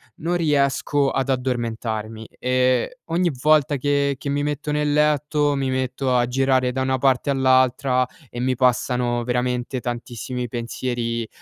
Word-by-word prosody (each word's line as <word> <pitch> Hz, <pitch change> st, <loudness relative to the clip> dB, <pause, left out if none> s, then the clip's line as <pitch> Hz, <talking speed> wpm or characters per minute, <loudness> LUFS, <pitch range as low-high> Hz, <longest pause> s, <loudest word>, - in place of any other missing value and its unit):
non 175 Hz, +3 st, -1 dB
riesco 145 Hz, -2 st, +1 dB
ad 135 Hz, 0 st, -1 dB
addormentarmi 115 Hz, -4 st, -3 dB
e 130 Hz, -, +1 dB
ogni 170 Hz, +1 st, +1 dB
volta 150 Hz, -1 st, +3 dB
che 140 Hz, +1 st, +1 dB
che 140 Hz, -, -5 dB
mi 145 Hz, +1 st, 0 dB
metto 150 Hz, 0 st, -2 dB
nel 150 Hz, 0 st, 0 dB
letto, 150 Hz, -1 st, +2 dB
mi 135 Hz, -1 st, -1 dB
metto 130 Hz, 0 st, -1 dB
a 120 Hz, -1 st, +2 dB
girare 130 Hz, 0 st, +1 dB
da 130 Hz, -, -2 dB
una 130 Hz, 0 st, 0 dB
parte 135 Hz, +1 st, +2 dB
all'altra 130 Hz, -1 st, +3 dB, 0.2 s
e 120 Hz, -, -7 dB
mi 130 Hz, +1 st, 0 dB
passano 125 Hz, -1 st, +1 dB
veramente 125 Hz, +1 st, -1 dB
tantissimi 120 Hz, 0 st, -5 dB
pensieri, 115 Hz, 0 st, -3 dB
130 Hz, 140 wpm, -22 LUFS, 125-145 Hz, 0.2 s, volta